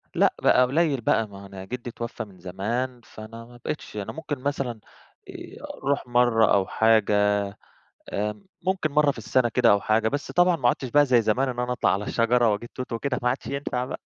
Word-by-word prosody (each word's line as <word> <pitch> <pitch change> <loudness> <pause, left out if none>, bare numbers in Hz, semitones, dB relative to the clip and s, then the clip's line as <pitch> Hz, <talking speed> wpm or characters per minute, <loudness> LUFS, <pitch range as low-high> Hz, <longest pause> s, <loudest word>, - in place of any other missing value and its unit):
لأ - - +4
بقى - - +5
قُليل 140 -1 +1
بقى 110 0 +1
ما 100 -1 -12
هو - - -11
أنا 95 -1 -9
جِدي 120 +2 -6
اتوفى 115 -1 -5
من 95 -3 -17
زمان، 115 +8 -3
فأنا 115 +2 -11
ما 120 0 -15
بقيتش، 150 - -5
أنا 100 - -4
ممكن 150 -4 -5
مثلًا 135 -4 -3 0.5
آآ - - -10 0.2
أرُوح 140 -2 0
مرّة 120 -2 +3
أو 95 -2 +2
حاجة 110 -2 +3 1.0
آمم 105 - -3 0.2
ممكن 185 -5 0
مرّة 150 -1 +4
في 130 - -6
السَنة 120 +2 +1
كده 125 +1 +3
أو 100 -1 +4
حاجة، 110 +1 +2
بس 145 +3 -4
طبعًا 175 -1 +4
ما 120 -4 +2
عُدتش 130 +1 -1
بقى 145 +3 +4
زي 125 -3 +4
زمان 125 +5 +1
إن 125 -1 -5
أنا 125 0 -1
أطلَع 125 - +1
على 100 +2 -1
الشجرة 120 0 +2
وأجيب 115 +3 -4
توت 130 -2 -6
وكده 125 +2 -2
ما 125 - +2
عدش 130 +2 -2
ينفع 140 -3 -2
بقى. 130 - -6
120 Hz, 210 wpm, -25 LUFS, 110-135 Hz, 1.0 s, بقى